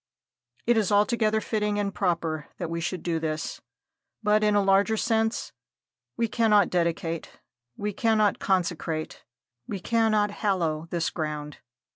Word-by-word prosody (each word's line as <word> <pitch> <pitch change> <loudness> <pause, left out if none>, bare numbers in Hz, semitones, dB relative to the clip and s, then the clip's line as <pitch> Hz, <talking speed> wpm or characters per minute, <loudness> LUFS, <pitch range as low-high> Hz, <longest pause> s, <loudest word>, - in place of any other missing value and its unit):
It 240 0 +3
is 210 -3 +1
altogether 215 +1 +3
fitting 210 -1 -1
and 200 -1 -1
proper 165 -5 -1
that 170 -2 -4
we 170 0 -2
should 175 +1 -3
do 165 -2 0
this. 155 -1 -3 0.6
But, 210 0 +3
in 210 -1 +3
a 205 - +4
larger 195 +3 +3
sense, 225 0 0 0.7
we 230 -1 +1
cannot 210 -4 +3
dedicate 170 -2 -2 0.4
we 210 0 -2
cannot 215 -1 +2
consecrate 170 -4 -1 0.4
we 200 - -4
cannot 215 0 +2
hallow 170 -7 -1
this 170 -1 -1
ground. 150 -2 -4
200 Hz, 135 wpm, -26 LUFS, 165-215 Hz, 0.7 s, a